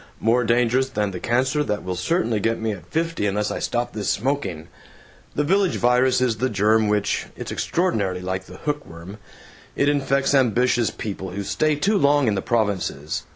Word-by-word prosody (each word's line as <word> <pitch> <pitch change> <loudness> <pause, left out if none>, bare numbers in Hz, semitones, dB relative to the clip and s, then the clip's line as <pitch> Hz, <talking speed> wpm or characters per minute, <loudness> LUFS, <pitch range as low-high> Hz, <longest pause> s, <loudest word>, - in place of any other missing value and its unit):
More 120 +2 +2
dangerous 120 +3 +2
than 105 -6 -1
the 90 - -6
cancer 130 - +1
that 105 -7 -2
will 90 0 -3
certainly 115 - 0
get 115 +3 0
me 110 0 -1
at 90 -5 -8
fifty 165 - -1
unless 105 +1 -1
I - - -3
stop 120 0 -2
this 105 -3 -2
smoking. 100 - -2 0.7
The 150 - +1
Village 190 +4 +2
Virus 125 +1 +3
is 120 -3 +1
the 130 +4 0
germ 110 +1 +2
which 105 -1 0
it's - - -6
extraordinarily 100 - -1
like 95 +1 -3
the - - -12
hook 150 -1 -3
worm 85 +6 -11 0.6
it 140 - +1
infects 140 -1 +1
ambitious 125 -2 +3
people 95 -3 -6
who 100 +3 -4
stay 155 +9 +1
too 200 +8 +1
long 145 -3 +3
in 110 - +2
the 95 - -1
provinces. 90 -9 -1
115 Hz, 185 wpm, -23 LUFS, 100-135 Hz, 0.7 s, Virus